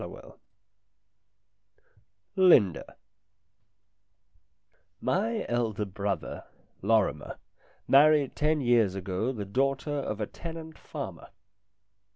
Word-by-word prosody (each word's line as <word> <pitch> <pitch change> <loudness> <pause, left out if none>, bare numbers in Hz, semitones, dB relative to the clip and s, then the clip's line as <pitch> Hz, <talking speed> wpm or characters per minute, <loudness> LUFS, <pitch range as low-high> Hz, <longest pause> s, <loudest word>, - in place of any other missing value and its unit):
"] - - -6 2.3
LINDA 175 - +4 2.0
MY 220 +4 -1
elder 110 -4 -1
brother, 100 0 -4 0.4
Lorrimer, 100 -8 0 0.5
married 145 0 +5
ten 150 0 +1
years 115 -6 +3
ago 95 +5 -2
the 105 -6 -5
daughter 135 +7 -1
of 135 -7 -3
a 105 - -1
tenant 160 +4 -9
farmer. - - -8
120 Hz, 80 wpm, -28 LUFS, 100-150 Hz, 2.3 s, married